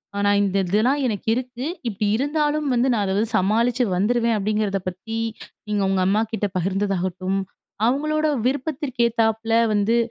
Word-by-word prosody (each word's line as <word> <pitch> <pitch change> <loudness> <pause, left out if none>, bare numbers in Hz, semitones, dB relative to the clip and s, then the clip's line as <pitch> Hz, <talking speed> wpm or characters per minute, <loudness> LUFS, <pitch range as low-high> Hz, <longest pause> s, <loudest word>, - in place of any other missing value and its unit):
அ - - -3
நான் 205 0 +4
இந்த 195 -1 +1
இதெல்லாம் 225 +10 +2
எனக்கு 210 -1 -4
இருக்கு, 250 +1 -4 0.2
இப்டி 205 0 -2
இருந்தாலும் 295 +1 0
வந்து 245 +2 +2
நான் 210 -3 +1
அத 190 - -1
வந்து 225 +2 -1
சமாளிச்சு 230 +6 +2
வந்துருவேன் 230 +4 +2
அப்டிங்கிறத 210 -1 0
பத்தி 225 +5 -7 0.5
நீங்க 205 -1 0
உங்க 190 -1 +1
அம்மாகிட்ட 215 +1 0
பகிர்ந்ததாகட்டும், 190 0 -1 0.5
அவங்களோட 305 +4 0 0.2
விருப்பத்ததிற்க்கேத்தாப்புல 240 -6 0 0.2
வந்து, 210 +3 +2
225 Hz, 135 wpm, -22 LUFS, 200-250 Hz, 0.5 s, நான்